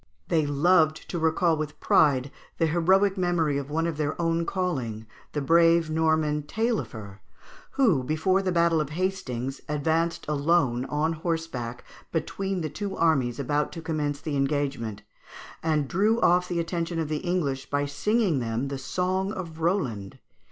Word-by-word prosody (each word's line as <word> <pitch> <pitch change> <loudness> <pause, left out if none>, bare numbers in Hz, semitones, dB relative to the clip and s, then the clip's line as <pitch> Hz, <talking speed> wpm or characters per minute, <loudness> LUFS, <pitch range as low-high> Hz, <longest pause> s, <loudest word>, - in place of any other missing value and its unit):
They 155 -3 +2
loved 155 +2 +3
to 175 - -2
recall 160 +1 +2
with 150 0 -5
pride 140 -3 +3 0.3
the 165 - +2
heroic 190 +5 +3
memory 165 -5 +1
of 140 0 -7
one 160 +2 0
of 165 -3 -2
their 155 +1 -2
own 165 0 0
calling, 130 - -2 0.3
the 150 - -1
brave 165 +2 +4
Norman, 160 -1 +1
Taillefer, 145 - -3 0.5
who, 220 - +3
before 160 +7 +1
the 190 -1 -1
battle 170 -2 +3
of 150 - -3
Hastings, 150 -7 -3
advanced 160 +3 0
alone 140 -4 +1
on 155 +3 0
horseback 160 -8 -4 0.3
between 190 +3 -2
the 160 - -1
two 200 +4 -4
armies 135 -7 +2
about 145 +2 0
to 165 - -6
commence 150 -3 -2
the 150 -1 -4
engagement, 135 -7 -1 0.6
and 155 -3 +1
drew 210 - +2
off 180 -1 +4
the 175 -1 -2
attention 170 0 -2
of 160 -2 -1
the 155 0 -1
English 150 -7 -2
by 145 0 0
singing 180 - +1
them 120 +3 -2
the 140 -1 -4
song 185 +7 -1
of 170 -6 -7
Roland. 130 - -1
160 Hz, 155 wpm, -26 LUFS, 145-175 Hz, 0.6 s, brave